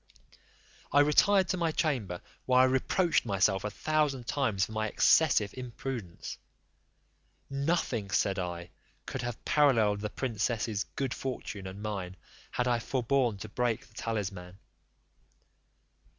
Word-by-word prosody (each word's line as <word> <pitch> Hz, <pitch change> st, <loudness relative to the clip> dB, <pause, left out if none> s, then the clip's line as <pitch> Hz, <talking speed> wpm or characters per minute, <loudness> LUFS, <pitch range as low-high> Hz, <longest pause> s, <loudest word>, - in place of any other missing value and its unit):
I 145 Hz, -, +6 dB
retired 190 Hz, +6 st, +4 dB
to 185 Hz, -, 0 dB
my 165 Hz, -2 st, +1 dB
chamber, 120 Hz, -, -1 dB, 0.3 s
where 130 Hz, 0 st, +6 dB
I -, -, +7 dB
reproached 130 Hz, +7 st, +2 dB
myself 95 Hz, -2 st, +1 dB
a 105 Hz, -, -1 dB
thousand 145 Hz, +1 st, 0 dB
times 110 Hz, -9 st, +1 dB
for -, -, -12 dB
my 110 Hz, 0 st, -1 dB
excessive 110 Hz, -2 st, +4 dB
imprudence: 125 Hz, -6 st, -6 dB, 1.1 s
"Nothing," 140 Hz, -, 0 dB
said 100 Hz, -1 st, +1 dB
I, 85 Hz, -1 st, -5 dB, 0.3 s
"could 130 Hz, -, -4 dB
have 120 Hz, -2 st, -5 dB
paralleled 115 Hz, -9 st, +3 dB
the 105 Hz, 0 st, -3 dB
princess's 110 Hz, -3 st, -1 dB
good 135 Hz, -3 st, -1 dB
fortune 110 Hz, -7 st, -5 dB
and 95 Hz, +2 st, -8 dB
mine, 95 Hz, -4 st, -4 dB, 0.3 s
had 125 Hz, -, -1 dB
I 120 Hz, -1 st, +2 dB
forborne 125 Hz, -1 st, 0 dB
to 110 Hz, -, -5 dB
break 120 Hz, +1 st, -1 dB
the 110 Hz, -, -24 dB
talisman." 95 Hz, -5 st, -4 dB
115 Hz, 130 wpm, -30 LUFS, 100-135 Hz, 1.1 s, I